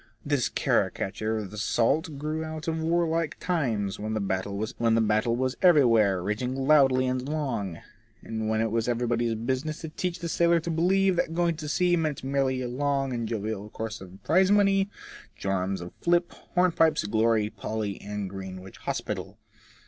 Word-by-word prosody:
This 145 -4 +1
caricature 110 +3 0
of 105 -3 -5
the 105 - -6
salt 145 - +1
grew 155 +2 -3
out 155 0 -6
of 160 0 -1
war 170 +1 +2
like 165 -1 -1
times, 115 - -1
when 110 +1 -3
the 100 +3 0
battle 110 +2 +2
was 130 +1 -1
everywhere 115 - +5
raging 115 +6 -2
loud 135 0 +5
and 130 +1 0
long, 120 - -2 0.5
and 110 -1 -3
when 110 0 +1
it 115 -1 0
was 115 0 0
everybody's 120 -1 0
businiess 130 +7 -2
to 160 - -5
teach 180 +3 -3
the 170 - -5
sailor 170 0 +3
to 170 - -3
believe 185 +3 +2
that 165 - 0
going 170 -1 +2
to 150 -1 -5
sea 175 +3 +3
meant 155 -5 -2
merely 135 -1 0
a - - -2
long 135 +1 -1
and 115 -2 -2
jovial 110 -1 -3
course 110 0 -5
of 95 +1 -12
prize 185 +3 +4
money, 200 -1 +4 0.5
jorums 95 -1 -1
of 85 - -8
flip, 175 0 +2 0.2
hornpipes, 165 -3 +3
glory, 110 0 +2
Polly, 105 -2 -4
and 105 -1 -4
Greenwich 95 0 -8
Hospital. - - -4
125 Hz, 165 wpm, -27 LUFS, 110-160 Hz, 0.5 s, everywhere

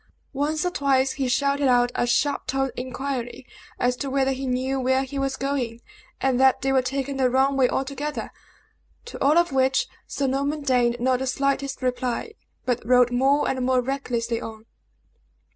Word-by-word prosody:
Once 300 +4 -1
or 360 - 0
twice 270 -4 +2
he 270 -1 -2
shouted 280 +2 +1
out 245 -1 +3
a 240 - 0
sharp 285 +4 +1
toned 270 0 0
inquiry 255 -1 -4 0.3
as 245 0 +1
to 275 +2 -4
whether 270 0 +1
he 265 0 -3
knew 260 +2 -1
where 260 +1 +2
he 275 +1 -5
was 270 0 -1
going, 265 -4 -2 0.4
and 260 -2 +1
that 265 -1 +4
they 270 - +1
were 265 -1 +4
taking 275 +1 -3
the 260 -1 +3
wrong 265 +2 +2
way 260 -2 +3
altogether; 280 +2 -3 0.7
to 475 - -6
all 295 +4 +4
of 345 -2 +3
which 265 0 +2 0.2
Sir 280 - -2
Norman 280 +3 -1
deigned 245 -3 +2
not 255 +1 +1
the 265 - -2
slightest 275 0 -1
reply, 255 - -2 0.3
but 245 -2 -1
rode 250 +1 +4
more 270 +4 +2
and 260 -1 -1
more 255 0 +2
recklessly 245 -3 -2
on. 220 0 -8
265 Hz, 175 wpm, -24 LUFS, 250-275 Hz, 0.7 s, that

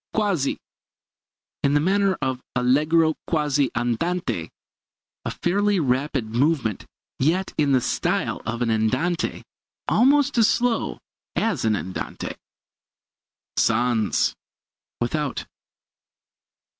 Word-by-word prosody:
] - - -65
Quasi 195 -10 +1 1.0
in 140 +1 +2
the - - +5
manner 195 +3 +2
of. 130 -1 -1
Allegro 155 +6 +3
quasi 145 -4 +1
andante 120 - -1 0.8
a - - -1
fairly 200 +2 +1
rapid 135 -2 0
movement, 125 - +1 0.3
yet 170 +8 +1
in 145 -2 +2
the 130 -2 +4
style - - -1
of 115 +2 -2
an 115 - +1
andante; 130 +11 0 0.4
almost 280 0 +4
as 220 - +6
slow 245 -2 0 0.4
as 195 - 0
an 110 -1 +3
andante. 95 -1 -5 1.2
Sans 115 -2 +2 0.7
without. 140 +4 -2
145 Hz, 100 wpm, -24 LUFS, 120-180 Hz, 1.2 s, as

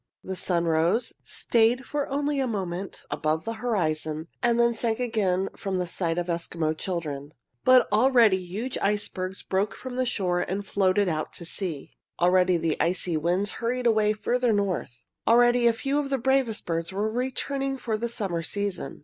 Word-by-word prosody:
The 190 - -4
sun 175 -2 +1
rose, 170 +8 +1
stayed 235 +3 +1
for 290 -1 -2
only 285 +1 -1
a 265 - +1
moment 190 -4 -4
above 155 +2 -1
the 225 - -2
horizon, 160 -8 -1
and 240 0 +2
then 235 0 +4
sank 230 0 -1
again 200 -6 0
from 195 -2 -3
the 180 - 0
sight 170 -1 -1
of 175 - 0
Eskimo 170 -2 -1
children. 155 -5 -4 0.3
But 255 0 +6
already 230 -2 +5
huge 195 +8 -4
icebergs 190 -2 -1
broke 195 +3 -1
from 255 -1 -7
the 255 -1 +1
shore 180 -6 0
and 195 +3 -3
floated 195 0 +2
out 155 -3 -2
to 170 - -8
sea. 165 -5 -4 0.3
Already 180 0 +4
the 165 -2 -1
icy 175 0 +1
winds 175 +6 +1
hurried 245 +2 -1
away 215 -2 +3
farther 245 +3 0
north. 185 - -2 0.2
Already 240 +1 +5
a - - +6
few 275 +5 -1
of 285 -2 -2
the 270 - +1
bravest 260 -3 +1
birds 165 0 -2
were 200 +3 -1
returning 270 +3 -2
for 230 -3 -2
the 235 +2 -2
summer 195 -7 -2
season. 190 -2 -3
200 Hz, 175 wpm, -26 LUFS, 175-240 Hz, 0.3 s, But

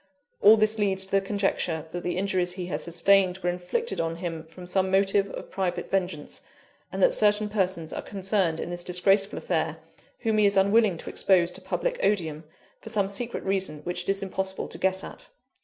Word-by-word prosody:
All 215 +2 +8
this 215 0 +2
leads 190 -2 +2
to 190 - -11
the 195 - +3
conjecture 195 -5 -1
that 175 - -4
the 175 0 -3
injuries 185 -2 0
he 180 -1 -5
has 180 - -3
sustained 185 +2 +3
were 175 -2 -1
inflicted 180 - -2
on 165 0 -2
him 165 -2 -6
from 180 +2 -11
some 190 +1 0
motive 195 +1 +2
of - - -8
private 180 -2 -3
vengeance; 180 -6 -2 0.5
and - - -1
that - - +5
certain 210 - +4
persons 185 -6 -1
are - - -4
concerned 190 -4 -1
in - - -4
this 175 0 -3
disgraceful 195 +3 +2
affair, - - -1 0.4
whom 220 -2 +1
he 210 - +5
is 200 - +1
unwilling 200 -1 +4
to - - -7
expose 180 -3 +3
to - - -7
public - - -2
odium, 160 -6 0 0.3
for 225 - -9
some 205 -4 +1
secret 230 +5 -3
reason 190 -6 -2
which 175 +1 -2
it 175 - -5
is 195 0 0
impossible 190 0 -3
to - - -6
guess 190 0 0
at. - - -10
190 Hz, 200 wpm, -26 LUFS, 175-200 Hz, 0.5 s, All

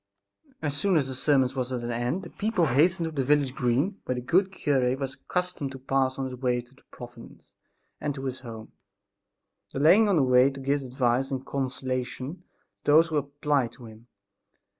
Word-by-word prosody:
As 145 -2 -1
soon 185 +4 +2
as 140 -4 +1
the 130 - -4
sermon 130 -1 +2
was 130 -1 -2
at 125 -2 -3
an 120 - -3
end 120 +10 -2
the - - -10
people 210 -5 0
hastened 165 +6 +3
to 160 - -3
the 140 -4 -1
village 140 -1 +2
green, 135 - 0
where 125 - -1
the 125 - -3
good 185 +9 +2
cure 135 -8 +1
was 135 -1 -4
accustomed 180 -6 -3
to - - -7
pass 135 0 0
on 135 -1 -2
the 130 - -6
way 125 -1 0
to 120 +1 -12
the 135 - -23
"Providence" 120 -1 -13 0.5
and 145 -2 -2
to 135 -1 -6
his 130 -1 -3
home, 115 -3 -9 1.0
delaying 185 +10 +5
on 195 - +3
the 150 - +4
way 125 +1 +5
to 135 0 -9
give 140 +1 0
advice 130 0 0
and 135 -1 -4
consolation 130 +2 -3 0.5
to - - +2
those 160 +2 +6
who 155 - 0
applied 145 -3 0
to 125 - -13
him. 110 +1 -14
135 Hz, 200 wpm, -27 LUFS, 125-150 Hz, 1.0 s, those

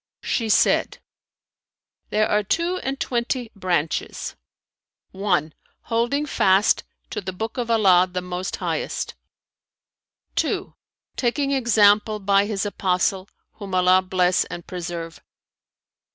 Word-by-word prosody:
She 225 -2 -1
said, - - +3 1.1
"There 215 +1 +2
are 210 - +2
two 335 - 0
and 275 -5 -4
twenty 240 -1 -2
branches: 175 -5 -2 0.8
(1) 180 -6 0 0.3
holding 240 +6 0
fast 195 -7 +3 0.3
to 210 - -3
the 190 0 -4
Book 220 +6 -5
of 235 -1 -2
Allah 190 -5 +5
the 180 - -2
Most 180 +1 -4
Highest; - - -3 1.2
(2) - - -1 0.4
taking 275 +3 0
example 215 -4 +4
by 200 0 +2
His 210 -2 -2
Apostle 190 -1 0 0.3
(whom 195 -3 -5
Allah 185 0 +5
bless 185 -1 +2
and 175 - -8
preserve!) 170 -2 -6
200 Hz, 110 wpm, -23 LUFS, 185-230 Hz, 1.2 s, Allah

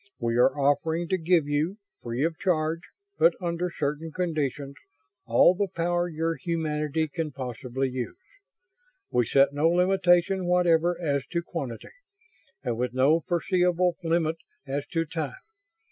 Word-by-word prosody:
We 115 -1 -1
are 125 - +4
offering 160 +4 +1
to 190 - +2
give 165 -2 +2
you; 150 +7 0 0.2
free 120 +3 -2
of 165 0 0
charge 160 -3 0 0.4
but - - +5
under 175 0 -2
certain 150 0 -3
conditions, 150 -5 -2 0.5
all 120 +9 +6
the 200 +2 -1
power 175 -1 -1
your 165 0 -1
humanity 155 0 -1
can 155 0 -4
possibly 130 0 -3
use. 130 - -5 0.9
We 120 -2 +2
set 140 +1 +4
no 150 +3 +3
limitation 180 +1 +3
whatever 175 -1 +3
as 140 -5 0
to 170 0 0
quantity 135 -10 -6 0.7
and 120 -2 -2
with 125 0 -2
no 140 +5 +4
foreseeable 180 +1 +1
limit 165 -1 +1 0.3
as 140 +1 -3
to 165 -1 -1
time. 150 -4 -4
160 Hz, 140 wpm, -26 LUFS, 140-175 Hz, 0.9 s, all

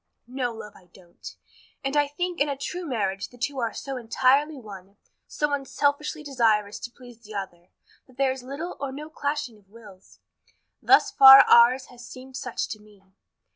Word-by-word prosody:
"No, 250 0 -3
love, 220 -2 -10
I 185 - -19
don't; 170 - -14 0.5
and 270 +1 -3
I 290 -1 +3
think 350 +3 -4
in 290 - +2
a 280 - -3
true 355 +5 -6
marriage 200 -7 -3
the 245 - -18
two 275 +2 -3
are 230 -2 -1
so 270 -1 -6
entirely 265 +5 +1
one 200 -4 -12 0.3
so 295 -1 -2
unselfishly 285 +2 -2
desirous 220 -7 0
each - - -6
to 240 - -10
please 245 -3 -15
the 215 -2 -12
other 175 -3 -7 0.4
that 255 -1 -22
there 270 -1 +2
is 260 0 -6
little 280 +7 -7
or 275 -1 -4
no 300 +3 -9
clashing 285 -8 -4
of 195 -2 -30
wills. 205 -4 -17 0.6
Thus - - +4
far 270 0 +10
ours 250 +3 +5
has 245 0 -14
seemed 260 +2 -12
such 250 -2 -4
to 215 - -7
me. 210 -2 -21
255 Hz, 185 wpm, -25 LUFS, 215-280 Hz, 0.6 s, far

